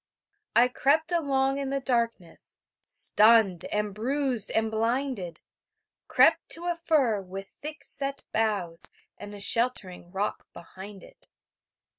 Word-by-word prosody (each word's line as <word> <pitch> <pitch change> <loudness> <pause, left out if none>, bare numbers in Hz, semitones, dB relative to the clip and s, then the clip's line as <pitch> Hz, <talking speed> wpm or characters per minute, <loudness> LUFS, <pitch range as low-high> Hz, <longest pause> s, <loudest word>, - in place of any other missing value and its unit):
I 240 +1 +6
crept 295 +6 +1
along 275 -4 +1
in 275 -1 -3
the 275 0 -1
darkness, 230 -9 -3 0.3
Stunned 210 -5 +4
and 210 -1 -2
bruised 250 0 0
and 220 0 0
blinded... 225 -4 -2 0.7
Crept 330 0 +4
to 335 - -8
a 350 -1 0
fir 285 -11 +1
with 195 +1 -8
thick 300 -1 -7
set 275 0 -5
boughs, 200 -7 -1 0.3
And 205 0 -8
a - - -9
sheltering 200 -5 0
rock 200 +2 -3
behind 190 +4 -11
it. - - -19
230 Hz, 125 wpm, -27 LUFS, 200-275 Hz, 0.7 s, I